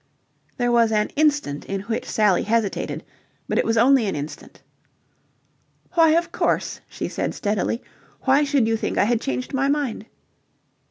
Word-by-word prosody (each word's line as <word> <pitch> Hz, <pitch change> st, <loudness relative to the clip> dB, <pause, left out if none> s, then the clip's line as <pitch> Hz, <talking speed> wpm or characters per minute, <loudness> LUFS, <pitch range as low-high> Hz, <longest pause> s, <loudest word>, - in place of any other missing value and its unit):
There 245 Hz, -2 st, +1 dB
was 230 Hz, -2 st, +4 dB
an 210 Hz, -1 st, +1 dB
instant 290 Hz, -, 0 dB
in 195 Hz, 0 st, -3 dB
which 225 Hz, +3 st, -4 dB
Sally 210 Hz, -5 st, +3 dB
hesitated, 220 Hz, -2 st, -1 dB, 0.4 s
but -, -, 0 dB
it -, -, +1 dB
was 225 Hz, 0 st, +1 dB
only 245 Hz, -1 st, +5 dB
an 195 Hz, -, -2 dB
instant. 145 Hz, +1 st, -8 dB, 1.3 s
"Why, 325 Hz, -3 st, +5 dB
of 340 Hz, +1 st, +1 dB
course," -, -, -1 dB
she -, -, -4 dB
said, -, -, -3 dB
steadily. 210 Hz, +3 st, -1 dB, 0.4 s
"Why 275 Hz, +2 st, +3 dB
should 280 Hz, -5 st, +2 dB
you 225 Hz, -, +2 dB
think -, -, -3 dB
I -, -, +4 dB
had 230 Hz, +2 st, +1 dB
changed 255 Hz, -1 st, -3 dB
my 270 Hz, +1 st, +1 dB
mind?" 280 Hz, -7 st, -1 dB
230 Hz, 160 wpm, -23 LUFS, 210-275 Hz, 1.3 s, only